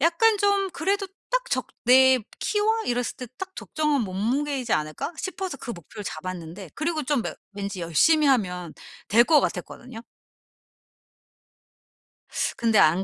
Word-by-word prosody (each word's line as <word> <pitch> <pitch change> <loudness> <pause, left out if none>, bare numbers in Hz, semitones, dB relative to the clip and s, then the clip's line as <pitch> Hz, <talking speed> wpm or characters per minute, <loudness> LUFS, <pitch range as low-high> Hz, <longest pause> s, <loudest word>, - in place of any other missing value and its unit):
약간 405 +8 +4
좀 400 -1 +2
그래도 395 +3 -1 0.2
딱 - - +1
적 - - 0 0.2
내 260 +1 +7 0.2
키와 440 +1 +1
이랬을 245 -1 -1
때 250 - -7
딱 380 0 -7
적정한 300 -4 0
몸무게이지 245 +7 -1
않을까 155 - -2
싶어서 375 -4 -4
그 240 - -6
목표를 205 +4 -10
잡았는데. 175 +1 -6
그리고 315 0 -1
좀 280 -3 0
뭐 - - -4 0.2
왠지 200 -2 -5
열심히 295 - +3
하면 180 - 0 0.4
될 230 +3 +6
것 305 +1 +5
같았거든요. 230 -3 -5 2.6
근데 225 -3 +3
안 170 +5 +4
255 Hz, 275 characters per minute, -25 LUFS, -, 2.6 s, 내